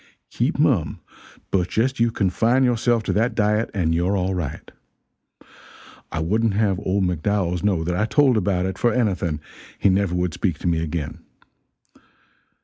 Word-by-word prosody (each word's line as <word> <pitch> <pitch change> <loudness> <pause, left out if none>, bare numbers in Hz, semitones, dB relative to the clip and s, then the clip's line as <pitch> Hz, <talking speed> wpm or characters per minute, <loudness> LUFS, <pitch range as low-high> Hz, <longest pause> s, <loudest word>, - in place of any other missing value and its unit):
keep - - -1
mum, - - +1 0.5
but 90 -2 +1
just 130 +3 0
you 115 0 +3
confine 115 +5 +1
yourself 120 -2 +2
to - - -1
that 115 +4 +1
diet 105 +1 +1
and 85 -5 0
you're 90 +4 +1
all 95 +1 -1
right. 85 -6 -5 1.4
I - - -3
wouldn't 105 +6 +1
have 100 -3 +1
old 95 0 0
McDowells 90 0 0
know 95 -6 +1
that 90 +1 -2
I 105 +4 +1
told 135 +2 +3
about 95 -3 0
it 95 0 -4
for 120 - +3
anything 95 -10 0 0.4
he - - +3
never 95 -2 +1
would 90 -2 -1
speak 85 0 -1
to - - -4
me 85 -2 +1
again. 80 -2 -4
95 Hz, 160 wpm, -22 LUFS, 90-110 Hz, 1.4 s, you